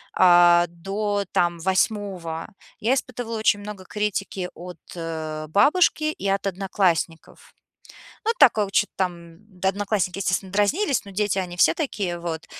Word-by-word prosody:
а, 175 -1 +6
до, 200 +4 -2
там, 175 -1 +1
8 190 -3 -1 0.3
я 235 +5 +2
испытывала 245 -3 -4
очень 205 -1 +3
много 205 -2 -8
критики 195 -2 -3
от, 180 -1 -9 0.2
э, 155 -2 -5
бабушки 305 - +3
и 200 - -5
от 195 0 0
одноклассников. 185 -3 -2 0.7
Ну, 455 - +3
такого 220 -8 +5
чё-то 205 - +2
там 170 -3 -3 0.2
Да, 190 - +2
одноклассники, 195 -2 -1
естественно, 185 0 -1
дразнились, 260 - +1
но 200 - -10
дети, 205 -1 0
они 175 -1 -4
все - - +5
такие 200 - -3
вот. 165 -2 -5
195 Hz, 140 wpm, -23 LUFS, 175-210 Hz, 0.7 s, а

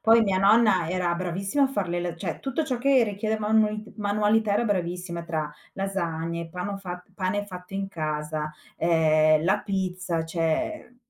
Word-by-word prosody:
Poi, 225 +1 +6
mia 195 -3 +2
nonna 200 -3 +4
era 180 -2 0
bravissima 190 +9 -1
a - - +6
far 205 -9 -2
le 175 0 -1
la 175 -1 -3
cioè, 165 0 -4
tutto 275 +4 -1
ciò 255 -4 -2
che 265 -1 +4
richiede 215 +1 -2
manualit 215 0 +1
manualità 210 +1 +2
era 235 - +2
bravissima, 180 -3 -2
tra 160 -2 -2 0.3
lasagne, 170 -4 -3
pano 180 +4 -4
fat 180 -2 -7
pane 205 +1 -1
fatto 180 -1 -10
in 195 0 -1
casa, 155 -3 -3 0.3
ehm, 155 -2 +4
la 190 - +3
pizza, 185 -4 -2
cioè 170 - -2
185 Hz, 160 wpm, -26 LUFS, 170-210 Hz, 0.3 s, Poi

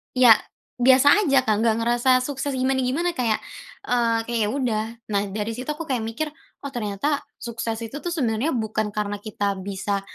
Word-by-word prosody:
ya 250 -2 +7 0.5
biasa 285 +9 +6
aja 270 -2 +4
Kak, 215 -1 +2
nggak 225 -1 +3
ngerasa 240 +2 +3
sukses 285 0 -3
gimana-gimana, 265 +6 0
kayak, 230 -7 +1 0.5
eee, 230 -2 +2
kayak 235 -1 -1
yaudah. 230 -5 -1 0.3
Nah, 200 0 0
dari 215 +3 -3
situ 255 +4 -7
aku 300 +2 -3
kayak 255 -5 -1
mikir, 225 +8 -3 0.4
oh 275 - -4
ternyata 240 +6 -1 0.2
sukses 230 -1 -4
itu 280 +7 -7
tuh 350 - -3
sebenarnya 260 -3 0
bukan 215 -1 -1
karena 205 -1 -3
kita 205 -2 -2
bisa, 200 +1 -2
235 Hz, 165 wpm, -24 LUFS, 215-270 Hz, 0.5 s, ya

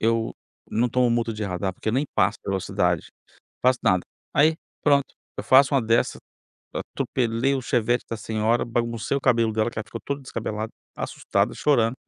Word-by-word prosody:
eu 115 0 +1 0.4
não 120 +3 +2
tomo 125 +1 +2
multa 115 -1 +1
de 105 0 -5
radar, 95 0 -2
porque 100 - -5
eu 110 - +1
nem 135 +4 +2
passo 95 +4 +2
a - - -7
velocidade, 95 -1 0 0.5
faço 125 0 +4
nada. 95 -1 +4 0.3
Aí, 155 +3 +5 0.3
pronto, 140 -2 +3 0.2
eu - - -5
faço 135 +1 +6
uma 135 - +5
dessa, 115 +1 +1 0.5
atropelei 125 +2 -1
o 135 - -1
Chevette 120 0 +1
da 115 - -3
senhora, 110 +2 0
baguncei 115 +1 -1
o - - -1
cabelo 115 -4 +3
dela, 110 +2 +1
que - - -7
ela 110 - -3
ficou 115 0 -8
toda 140 0 -3
descabelada, 110 -3 -4 0.3
assustada, - - -1
chorando. 120 -5 +2
115 Hz, 180 wpm, -24 LUFS, 110-130 Hz, 0.5 s, faço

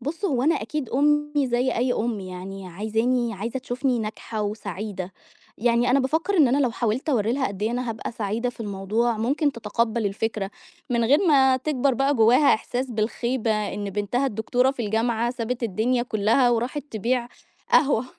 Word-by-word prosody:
بُص، 310 - -5
هو 260 -9 +1
أنا 320 +4 +3
أكيد 265 +2 -3
أمّي 295 0 +2
زي 245 +2 +1
أي 245 +1 +1
أم 225 -3 -1
يعني 185 +1 -7
عايزاني 225 +5 0
عايزة 230 +7 -4
تشوفني 255 -1 -1
ناجحة 215 0 -4
وسعيدة. 205 -2 -5 0.5
يعني 240 +2 +2
أنا 275 - +4
بافكّر 320 +9 0
إن 290 -6 +6
أنا 270 +4 +2
لو 255 -4 +2
حاولت 235 +4 -2
أورّي 230 -4 +2
لها 265 0 0
قد 200 +1 -7
إيه 220 - +1
أنا 245 -1 -2
هابقى 220 +1 -5
سعيدة 225 +3 -2
في 235 - -16
الموضوع، 215 +3 -1
ممكن 280 +6 +1
تتقبَّل 230 -1 -1
الفكرة 200 0 -2 0.4
من 235 -1 +2
غير 280 +6 +5
ما 265 -3 +5
تكبر 270 -1 0
بقى 275 +3 +2
جوّاها 245 +5 +5
إحساس 250 +3 -3
بالخيبة 235 +2 -1 0.2
إن 205 -1 -4
بنتها 210 +7 -1
الدكتورة 245 +3 +1
في 240 -5 -4
الجامعة 230 +2 0
سابت 245 0 -4
الدنيا 235 +4 +1
كُلّها 230 +2 +2
وراحت 240 +5 -1
تبيع 240 +3 -1 0.4
قهوة. 270 -5 +4
240 Hz, 170 wpm, -24 LUFS, 215-260 Hz, 0.5 s, إن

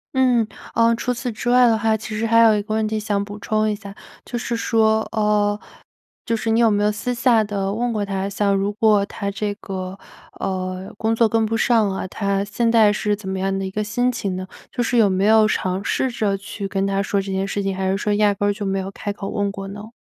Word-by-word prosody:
嗯， 250 -3 +3 0.3
呃， 230 0 +4
除 250 +2 -1
此 240 0 -4
之 230 +3 -3
外 250 0 +6
的 225 -1 +3
话， 220 0 +2
其 215 0 -5
实 230 - 0
还 230 0 +4
有 225 -1 +7
一 205 - 0
个 215 +1 -4
问 220 0 +1
题 215 0 -1
想 205 -1 -1
补 205 +1 -8
充 215 +1 0
一 - - 0
下。 200 -1 -9 0.3
就 240 - -4
是 235 0 -2
说， 220 -1 +2
呃， 210 -1 +2 0.7
就 230 - 0
是 225 0 -2
你 225 +1 +3
有 230 -1 +5
没 205 -1 +1
有 210 - +3
私 225 +4 -3
下 235 -1 +3
地 200 -1 -2
问 240 +2 -1
过 210 -2 -1
她？ 195 -1 -2
像 200 0 +1
如 195 +1 0
果 210 -1 +3
她 200 0 -4
这 205 0 -2
个， 190 -2 -6 0.4
呃， 185 0 -4
工 220 +1 0
作 225 -1 +3
跟 225 0 +2
不 225 +1 -1
上 225 -3 +3
啊， 190 - -3
她 200 0 -1
现 215 +3 0
在 225 -2 +5
是 210 0 0
怎 200 -2 -8
么 190 0 -2
样 195 0 -1
的 195 - -2
一 190 - -5
个 210 +2 -2
心 245 +4 +1
情 200 -6 -3
呢？ 185 0 -4 0.2
就 245 - -2
是 240 +1 0
有 215 -3 +5
没 190 0 0
有 220 0 +6
尝 190 -2 -1
试 260 +5 0
着 210 -4 0
去 195 +1 -6
跟 195 0 -1
她 195 0 0
说 200 0 0
这 195 0 -6
件 190 +1 -1
事 200 0 -2
情， 195 0 -1
还 190 0 -1
是 190 - +1
说 210 +1 -1
压 205 0 +3
根 205 +1 0
儿 - - +3
就 205 0 -5
没 195 0 0
有 190 +1 -5
开 205 +1 -5
口 200 -1 -6
问 205 -1 -1
过 195 -1 -7
呢？ 205 +3 -9
210 Hz, 280 characters per minute, -21 LUFS, 195-225 Hz, 0.7 s, 有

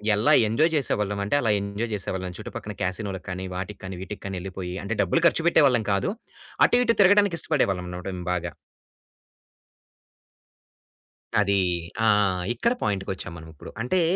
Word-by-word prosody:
ఎలా 105 +3 +3
ఎంజాయ్ 155 +10 +2
చేసేవాళ్ళం 105 -7 0
అంటే 105 - 0
అలా 115 - +2
ఎంజాయ్ 100 +3 -4
చేసేవాళ్ళం. 95 -2 -4
చుట్టుపక్కల 105 - -7
కాసినోలకి 95 0 -3
కానీ, 95 0 -4
వాటికి 95 +3 -5
కానీ, 95 0 -6
వీటికి 95 +2 -7
కానీ 100 -1 -4
వెళ్ళిపోయి, 90 -1 -6
అంటే 115 +3 -2
డబ్బులు 170 - +1
ఖర్చుపెట్టే 165 -1 +3
వాళ్ళం 120 -4 +1
కాదు. 100 - 0 0.5
అటు 245 - +3
ఇటు 230 -1 +2
తిరగడానికిష్టపడేవాళ్ళం 170 - +3
అన్నమాట 90 +1 -7
మేము 90 - -8
బాగా. 90 0 -3 2.9
అది. 100 -1 +2 0.4
ఆ! - - +4 0.5
ఇక్కడ 235 - +1
పాయింట్‌కొచ్చాం 95 -3 -3
మనం 80 - -11
ఇప్పుడు. 75 - -11
అంటే 175 +10 +1
100 Hz, 140 wpm, -25 LUFS, 95-130 Hz, 2.9 s, ఆ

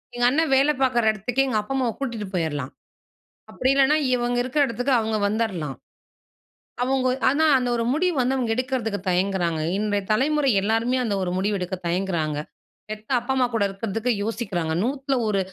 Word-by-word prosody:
எங்க 245 0 +1
அண்ணன் 310 +3 +1
வேலை 280 +3 +4
பார்க்குற 240 -4 +3
இடத்துக்கே 245 +6 0
எங்க 225 -5 +1
அப்பா 210 +6 -5
அம்மாவ 250 -4 0
கூட்டிட்டு 235 -7 -4
போயிர்லாம், 145 -6 -2 0.8
அப்பிடி 260 - +1
இல்லன்னா 275 +2 +4 0.2
இவுங்க 245 0 0
இருக்கிற 260 +4 +1
இடத்துக்கு 245 +3 -1
அவுங்க 220 -1 -1
வந்துர்லாம், 200 -10 -2 1.1
அவுங்க 260 0 +1 0.2
ஆனா 295 +4 +2
அந்த 250 -1 -1
ஒரு 230 - 0
முடிவு 350 +3 +1
வந்து 255 +2 +1
அவுங்க 240 -3 -1
எடுக்கிறதுக்கு 250 -4 -2
தயங்குறாங்க, 180 -3 0 0.2
இன்றைய 205 -1 -1
தலைமுறை 280 +3 +2
எல்லாருமே 225 +5 +1
அந்த 205 -3 0
ஒரு 180 - -2
முடிவு 200 +2 0
எடுக்க 180 +1 -3
தயங்குறாங்க, 170 -4 -1 0.5
பெத்த 215 0 -8
அப்பா, 245 +3 -4
அம்மா 255 -1 +3
கூட 220 - +2
இருக்கிறதுக்கு 220 +4 -2
யோசிக்கிறாங்க, 195 -8 -2
நூத்தில 270 +2 -1
ஒரு 200 -2 +1
230 Hz, 160 wpm, -23 LUFS, 195-260 Hz, 1.1 s, வேலை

